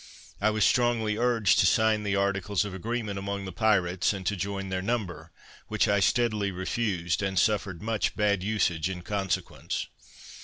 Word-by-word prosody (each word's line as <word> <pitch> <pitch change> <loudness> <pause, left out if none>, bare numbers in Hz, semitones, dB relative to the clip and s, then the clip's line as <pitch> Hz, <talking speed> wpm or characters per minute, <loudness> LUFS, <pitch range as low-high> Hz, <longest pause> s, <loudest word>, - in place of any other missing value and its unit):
I 105 - +4
was 110 -2 +2
strongly 120 -3 +2
urged 115 -4 +3
to 95 - +5
sign 110 +3 +3
the 100 -1 -1
articles 100 0 0
of 100 - -6
agreement 105 +1 -3
among 100 0 -4
the 95 - -6
pirates, 95 -2 +2
and 95 -2 -6
to 105 - 0
join 95 +1 -4
their 95 0 -2
number, 90 -7 -3 0.4
which 110 0 +1
I 100 -1 +3
steadily 105 0 +1
refused, 95 -1 -1
and 95 -1 -2
suffered 100 -4 +1
much 110 -1 -1
bad 100 -2 +1
usage 95 -4 0
in 90 -2 -6
consequence. 95 -1 -3
100 Hz, 165 wpm, -27 LUFS, 95-110 Hz, 0.4 s, to